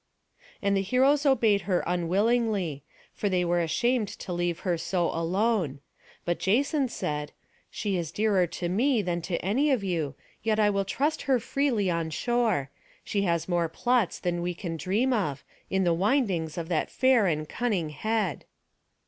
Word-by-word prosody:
And 200 Hz, 0 st, +2 dB
the 195 Hz, -, +2 dB
heroes 270 Hz, +8 st, +3 dB
obeyed 225 Hz, -7 st, +4 dB
her 180 Hz, -, +2 dB
unwillingly; 185 Hz, -, +1 dB, 0.3 s
for 205 Hz, -, -1 dB
they 180 Hz, -2 st, +1 dB
were 175 Hz, 0 st, +1 dB
ashamed 215 Hz, +8 st, +1 dB
to 185 Hz, -, -7 dB
leave 175 Hz, -1 st, -1 dB
her 180 Hz, -3 st, 0 dB
so 170 Hz, +1 st, -1 dB
alone; 175 Hz, -, 0 dB, 0.5 s
but 175 Hz, 0 st, -1 dB
Jason 270 Hz, -, +1 dB
said, 150 Hz, -7 st, -3 dB, 0.4 s
"She 200 Hz, -3 st, -2 dB
is 165 Hz, -3 st, -3 dB
dearer 205 Hz, -4 st, +2 dB
to 175 Hz, +1 st, -4 dB
me 230 Hz, +5 st, +2 dB
than 175 Hz, -1 st, -2 dB
to 170 Hz, +1 st, -2 dB
any 260 Hz, +10 st, +2 dB
of 255 Hz, -7 st, +1 dB
you, 165 Hz, -7 st, -2 dB, 0.3 s
yet 220 Hz, 0 st, +1 dB
I 210 Hz, -1 st, +4 dB
will 200 Hz, -1 st, 0 dB
trust 290 Hz, +10 st, -1 dB
her 260 Hz, -2 st, +4 dB
freely 235 Hz, -7 st, 0 dB
on 165 Hz, -1 st, -1 dB
shore; 195 Hz, -, 0 dB, 0.3 s
she 200 Hz, -, -1 dB
has 170 Hz, -2 st, 0 dB
more 175 Hz, -2 st, +1 dB
plots 240 Hz, +4 st, +1 dB
than 175 Hz, -1 st, -2 dB
we 175 Hz, 0 st, -2 dB
can 170 Hz, -1 st, -5 dB
dream 205 Hz, -, +1 dB
of, 150 Hz, -, -1 dB, 0.3 s
in 190 Hz, 0 st, +1 dB
the 175 Hz, -2 st, +3 dB
windings 185 Hz, -, 0 dB
of 165 Hz, -1 st, -3 dB
that 165 Hz, -3 st, 0 dB
fair 255 Hz, -6 st, +3 dB
and 155 Hz, -2 st, -1 dB
cunning 200 Hz, -9 st, -1 dB
head." 215 Hz, +3 st, -1 dB
190 Hz, 170 wpm, -27 LUFS, 170-230 Hz, 0.5 s, obeyed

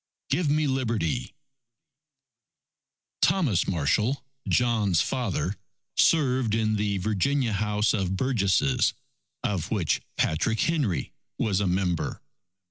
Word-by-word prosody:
Give 170 Hz, -4 st, +1 dB
Me 155 Hz, +1 st, +2 dB
Liberty! 115 Hz, -, -1 dB, 1.9 s
Thomas 135 Hz, -, +2 dB
Marshall, 105 Hz, -, 0 dB, 0.2 s
John's 110 Hz, -8 st, +2 dB
father, 105 Hz, -6 st, -2 dB, 0.4 s
served 130 Hz, -8 st, +3 dB
in 110 Hz, -1 st, +1 dB
the 105 Hz, -1 st, 0 dB
Virginia 110 Hz, +6 st, 0 dB
House 105 Hz, +1 st, +1 dB
of 95 Hz, -2 st, -1 dB
Burgesses 125 Hz, +2 st, +2 dB, 0.5 s
of 95 Hz, -2 st, -1 dB
which 95 Hz, -8 st, 0 dB, 0.2 s
Patrick 110 Hz, +8 st, +1 dB
Henry 135 Hz, -, 0 dB, 0.2 s
was 100 Hz, -3 st, +1 dB
a 100 Hz, -, 0 dB
member. 90 Hz, -2 st, -1 dB
105 Hz, 100 wpm, -26 LUFS, 95-130 Hz, 1.9 s, served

